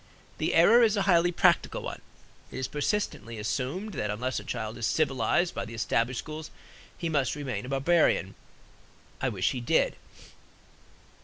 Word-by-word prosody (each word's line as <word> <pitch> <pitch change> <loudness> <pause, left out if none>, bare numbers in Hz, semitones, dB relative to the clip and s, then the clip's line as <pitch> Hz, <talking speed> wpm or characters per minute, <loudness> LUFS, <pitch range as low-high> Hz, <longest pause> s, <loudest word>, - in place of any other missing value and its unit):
The - - 0
error 235 +2 +7
is 220 -2 +3
a 200 - +2
highly 175 -2 +4
practical 175 -1 +2
one. - - -6 0.5
It - - -8
is 130 - -2
persistently 145 - -2
assumed 135 - -3
that 105 - -2
unless 125 +5 -2
a - - -10
child 110 0 -5
is 115 - 0
civilized 155 +4 +1
by - - -3
the 115 +2 -8
established 115 +2 0
schools, 155 +3 -6 0.5
he 170 - -3
must 145 -5 0
remain 135 -3 -4
a - - -7
barbarian. 135 - +2 0.9
I 130 - +1
wish 95 -6 0
he 125 - -4
did. 120 - +2
135 Hz, 160 wpm, -28 LUFS, 115-170 Hz, 0.9 s, error